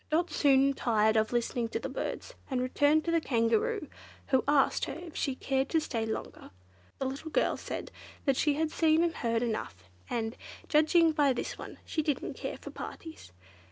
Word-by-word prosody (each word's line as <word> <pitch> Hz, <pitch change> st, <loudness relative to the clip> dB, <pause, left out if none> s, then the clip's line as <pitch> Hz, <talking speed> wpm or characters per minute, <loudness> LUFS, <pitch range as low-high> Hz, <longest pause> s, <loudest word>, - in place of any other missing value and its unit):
Dot 335 Hz, +3 st, +1 dB
soon 275 Hz, -1 st, +4 dB
tired 220 Hz, -4 st, +2 dB
of 220 Hz, 0 st, +2 dB
listening 240 Hz, -1 st, -1 dB
to -, -, -2 dB
the -, -, -4 dB
birds, -, -, -5 dB, 0.2 s
and 260 Hz, -3 st, 0 dB
returned 290 Hz, +5 st, +2 dB
to 335 Hz, -, 0 dB
the 335 Hz, -1 st, +3 dB
Kangaroo, 310 Hz, -, +1 dB, 0.4 s
who 265 Hz, -1 st, +3 dB
asked 285 Hz, -2 st, +3 dB
her -, -, -5 dB
if 345 Hz, -3 st, -9 dB
she 270 Hz, -3 st, -1 dB
cared 270 Hz, +1 st, -1 dB
to 325 Hz, -, +3 dB
stay 230 Hz, -7 st, -2 dB
longer. 220 Hz, -, -5 dB, 0.5 s
The 270 Hz, -, -2 dB
little 275 Hz, +5 st, -4 dB
girl -, -, +1 dB
said -, -, -6 dB, 0.4 s
she 290 Hz, +2 st, +2 dB
had 315 Hz, +1 st, 0 dB
seen 320 Hz, 0 st, +3 dB
and 340 Hz, -1 st, +1 dB
heard 230 Hz, -3 st, 0 dB
enough, 95 Hz, -, -4 dB, 0.2 s
and, 225 Hz, -1 st, -2 dB, 0.3 s
judging 320 Hz, +2 st, +4 dB
by 290 Hz, -3 st, +3 dB
this 245 Hz, -, -4 dB
one, -, -, -8 dB
she 315 Hz, -, -1 dB
didn't 295 Hz, -2 st, -2 dB
care -, -, -5 dB
for -, -, -9 dB
parties. 320 Hz, -, -9 dB
275 Hz, 185 wpm, -30 LUFS, 235-315 Hz, 0.5 s, soon